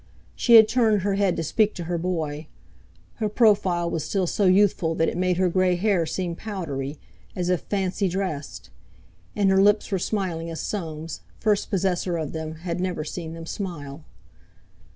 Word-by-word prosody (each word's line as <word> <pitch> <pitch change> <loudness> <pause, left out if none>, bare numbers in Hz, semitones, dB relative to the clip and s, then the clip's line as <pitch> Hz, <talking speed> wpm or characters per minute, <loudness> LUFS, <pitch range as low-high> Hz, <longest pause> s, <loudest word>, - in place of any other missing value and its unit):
She 235 - +5
had 220 -1 +9
turned 220 -5 +2
her 200 0 +1
head 195 -2 +1
to 165 - -1
speak 215 +7 +1
to 175 - -5
her 170 0 -2
boy; 160 -4 -3 0.7
her 215 -2 -1
profile 200 -6 +3
was 165 -3 -2
still 195 -2 0
so 200 +3 0
youthful 185 -3 +3
that 165 - +2
it - - -2
made 180 0 +1
her 185 0 +3
grey 185 0 +2
hair 180 -3 +1
seem 175 -1 -3
powdery, 155 -9 -5 0.4
as 180 -1 -1
if 180 -2 +1
fancy 195 0 -1
dressed; 180 -6 -4 0.6
and 200 -2 +3
her 190 0 +5
lips 205 +1 +3
were 190 - +1
smiling 175 -4 -2
as 165 - -5
Soames, 160 -5 -5 0.2
first 210 -3 +1
possessor 180 -2 0
of 155 -3 -3
them, 160 -1 -4
had 170 0 -2
never 180 -4 -2
seen 160 +1 -6
them 165 0 -8
smile. 160 -6 -6
180 Hz, 175 wpm, -24 LUFS, 165-200 Hz, 0.7 s, had